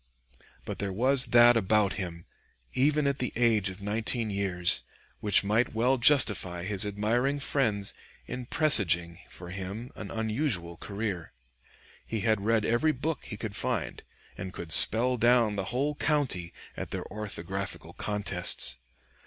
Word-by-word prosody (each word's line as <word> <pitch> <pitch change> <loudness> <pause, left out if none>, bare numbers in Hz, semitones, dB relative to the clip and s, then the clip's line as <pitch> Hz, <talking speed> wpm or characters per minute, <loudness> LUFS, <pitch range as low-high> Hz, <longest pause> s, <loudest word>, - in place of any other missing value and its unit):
But - - -6
there 100 -1 -3
was 125 +6 +5
that 120 0 +6
about 105 -2 +1
him, 85 -4 -7 0.5
even 150 +3 +1
at 140 0 -1
the 125 - -3
age 115 -4 +2
of 95 +2 -10
nineteen 110 +2 -2
years, 95 -3 0 0.4
which 105 -1 +2
might 110 +4 0
well 125 +3 +1
justify 105 - +3
his 100 +1 -3
admiring 120 +7 -1
friends 115 -8 0 0.3
in 125 -1 -7
presaging 85 - +3
for 90 0 -11
him 95 +6 -7
an 105 - -8
unusual 110 - -2
career. 100 -2 -6 0.7
He 110 -2 -5
had 110 0 0
read 110 0 0
every 120 +7 +1
book 150 +3 -4
he 105 - -8
could 105 -1 -6
find, 115 - -3 0.3
and 95 +1 -7
could 85 - -7
"spell 125 +9 +7
down" 120 -2 +2
the 100 -2 -3
whole 135 +8 -2
county 140 - -1 0.2
at - - -6
their - - -5
orthographical 100 -2 -6
contests. 100 -4 0
110 Hz, 145 wpm, -28 LUFS, 95-125 Hz, 0.7 s, spell